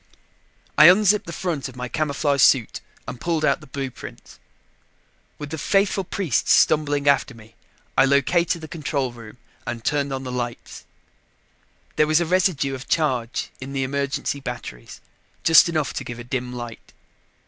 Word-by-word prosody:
I 150 - +10
unzipped 205 +2 +5
the - - -5
front 165 -6 -3
of 130 - -14
my 125 0 -5
camouflage 145 +1 0
suit 120 -2 +3 0.3
and 125 - -7
pulled 165 -3 0
out 165 - +1
the 150 - -14
blueprints. 135 -1 -8 1.0
With 145 -1 -8
the 160 - -4
faithful 195 +3 +1
priests 175 - -1
stumbling 145 -2 +2
after 140 -2 +2
me, 110 0 -16 0.4
I - - +5
located 165 +5 +2
the 155 - -8
control 145 -4 -3
room 115 -1 -13 0.3
and 120 -2 -5
turned 140 -1 0
on 135 0 -4
the 130 - -5
lights. 120 -1 -6 1.1
There 150 - +4
was 155 +1 +3
a 170 - 0
residue 165 -6 +1
of 130 0 -8
charge 130 -7 -1
in 135 +1 -7
the 135 -1 -1
emergency 140 +1 -2
batteries, 125 - -8 0.4
just 165 +1 +7
enough 155 -3 -1
to - - -4
give 120 - -7
a 120 - -8
dim 125 0 -4
light. 120 -2 -9
140 Hz, 160 wpm, -22 LUFS, 125-160 Hz, 1.1 s, I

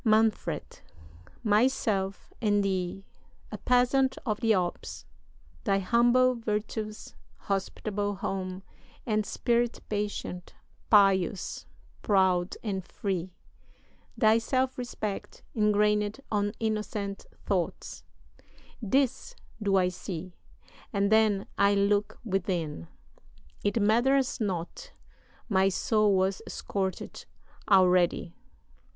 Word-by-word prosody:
"MANFRED. 220 -2 +1 0.6
Myself, 210 -3 +1
and 205 -2 +2
thee 190 0 -2 0.5
a - - -6
peasant 250 +2 +3
of 215 -4 -1
the 225 -2 +2
Alps 180 -4 -1 0.6
Thy 200 -3 +2
humble 240 +5 +4
virtues, 215 -1 -4 0.2
hospitable 205 +1 -2
home, 190 0 -4 0.4
And 215 -2 0
spirit 240 0 0
patient, 205 -3 -4 0.3
pious, 195 -2 +3 0.3
proud, 185 -3 +2
and 195 -4 -2
free; 185 -1 -4 0.8
Thy 220 -1 +5
self 260 +2 0
respect, 220 -5 -5
ingrained 210 +1 +2
on 205 -1 0
innocent 210 -2 -3 0.2
thoughts; 185 -4 -2 0.8
"This 265 - 0 0.3
do 200 -2 +2
I 185 -1 +3
see 180 -1 -7 0.6
and 200 -1 +1
then 215 -3 +3
I 200 0 +5
look 205 +1 +1
within 175 - -2 0.8
It 205 +3 +1
matters 250 +6 +2
not 205 - -4 0.5
my 195 -2 +3
soul 210 +1 +2
was 190 +1 +1
scorch'd 190 -2 -4 0.4
already!" 180 -3 +4
205 Hz, 95 wpm, -28 LUFS, 190-220 Hz, 0.8 s, Thy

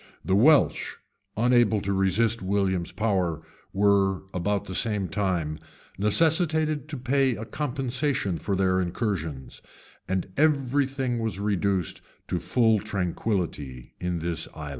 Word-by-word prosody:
The 95 - +2
Welsh, 140 +8 +3 0.4
unable 120 -2 +3
to 100 +1 -1
resist 100 +4 +2
William's 95 -2 -1
power, 90 -7 -1 0.3
were, 100 -1 +2
about 100 +3 -1
the 95 - -7
same 105 -2 +2
time, 85 -5 -2 0.4
necessitated 155 - +3
to 150 - -5
pay 130 0 +1
a 110 - -6
compensation 130 - -2
for 100 - -2
their 95 -1 +2
incursions; 85 - -4 0.5
and 95 -1 -1
every 140 -2 +2
thing 130 -3 -2
was 110 -4 -3
reduced 100 -3 0 0.3
to - - -1
full 110 -3 +2
tranquillity 90 - -3
in 90 -1 -2
this 85 -1 -3
island. 75 -2 -7
100 Hz, 125 wpm, -26 LUFS, 95-125 Hz, 0.5 s, Welsh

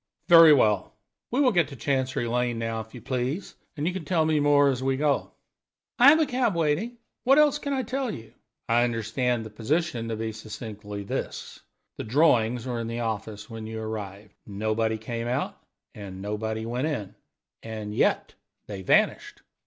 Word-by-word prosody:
"Very 165 -2 +9
well; 105 -9 +3 0.4
we 250 - -1
will 265 -3 +5
get 175 -6 +2
to 140 - -10
Chancery 130 0 -1
Lane 120 0 0
now, 115 0 -2
if 110 +3 -13
you 120 - -9
please, 130 +7 -3 0.2
and 145 - -2
you 180 - 0
can 190 -3 -5
tell 165 -2 +1
me 155 -1 +2
more 145 -1 +4
as 130 -2 -1
we 135 0 0
go." 145 0 0 0.7
"I 250 +3 +9
have 315 +2 +6
a 315 - +4
cab 250 -7 0
waiting. 170 +10 0 0.3
What 270 +3 +5
else 295 -1 +4
can 285 - -4
I 265 -2 0
tell 255 +2 -2
you?" 115 - -8 0.3
"I 120 +1 +3
understand 120 0 -1
the 110 - -9
position 120 0 -1
to 115 - -2
be 110 0 -3
succinctly 105 -1 -8
this: - - -5 0.4
The - - -4
drawings 120 -2 +2
were 120 -2 -3
in 115 - -3
the 115 +1 -3
office 110 -2 -4
when 115 -2 -7
you 110 0 -5
arrived. 105 -2 -6
Nobody 110 +2 -1
came 115 +1 -5
out, 125 - -2 0.3
and 95 -2 -9
nobody 110 +2 -3
went 125 +5 -2
in; 105 -11 -4 0.5
and 110 -2 -6
yet - - +1 0.3
they 100 -2 -7
vanished. 95 - +1
120 Hz, 185 wpm, -26 LUFS, 110-150 Hz, 0.7 s, Very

